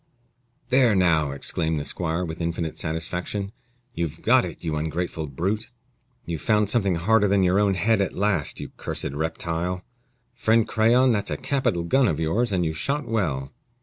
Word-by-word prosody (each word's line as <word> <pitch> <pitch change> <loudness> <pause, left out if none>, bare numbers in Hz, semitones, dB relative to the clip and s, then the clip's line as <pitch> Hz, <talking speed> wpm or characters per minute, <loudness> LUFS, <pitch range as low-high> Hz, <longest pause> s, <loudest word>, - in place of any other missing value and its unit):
"There, 125 -4 +4
now," 80 -5 +3
exclaimed 80 +3 -1
the - - -3
squire, 85 +1 -2
with 80 +1 -6
infinite 85 -1 -2
satisfaction, 90 +5 -3 0.4
"you've 80 -3 -4
got - - +4
it, - - -9
you 80 -2 -1
ungrateful 80 +1 -3
brute! 95 - -2 0.6
You've 85 -2 -4
found 105 -2 +2
something 100 -7 +2
harder 105 +5 +3
than 100 -1 +3
your 90 +2 +3
own 100 -2 +2
head 110 +3 +2
at 100 - -1
last, 100 -6 0
you - - -6
cursed - - -3
reptile! 85 +4 -2 0.5
Friend 110 0 +2
Crayon, 120 +4 +4
that's 105 -3 0
a - - -2
capital 130 -11 0
gun 130 +10 +3
of 80 -5 0
yours, 105 +9 +1
and 90 -3 +1
you 80 - -1
shot 140 - -2
well." 75 -13 -1
90 Hz, 170 wpm, -24 LUFS, 80-105 Hz, 0.6 s, There